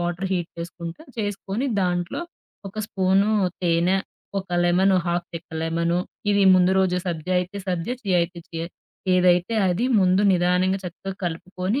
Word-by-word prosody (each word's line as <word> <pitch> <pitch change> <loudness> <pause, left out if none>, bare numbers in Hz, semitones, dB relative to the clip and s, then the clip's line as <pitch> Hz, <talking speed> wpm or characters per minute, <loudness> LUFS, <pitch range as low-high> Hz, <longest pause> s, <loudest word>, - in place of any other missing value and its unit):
water 175 +2 -2
heat 175 -2 -1
చేసుకుంటా, 170 - -7 0.2
చేసుకొని 205 +3 -2
దాంట్లో 175 - -1 0.5
ఒక 215 - -10
స్పూను 195 +1 +2 0.3
తేనె, 175 +2 +3 0.4
ఒక 190 - -14 0.2
లెమన్, 185 +2 +4
హాఫ్‌ 175 0 -1
చెక్క 165 +1 -8
లెమను, 170 +1 0 0.3
ఇవి 200 -1 +4
ముందు 185 0 +4
రోజు 185 -1 +2
సబ్జా 175 +1 -2
అయితే 180 +3 -6
సబ్జా, 180 +7 -1
చియా 185 -4 +2
అయితే 170 0 -5
చియా, 165 0 -4 0.5
ఏదైతే 180 +3 +3
అది 185 +7 0 0.2
ముందు 185 +1 +4
నిదానంగా 180 +2 +2
చక్కగా 190 +2 -6
కలుపుకొని 185 +7 -2
180 Hz, 140 wpm, -24 LUFS, 175-190 Hz, 0.5 s, లెమన్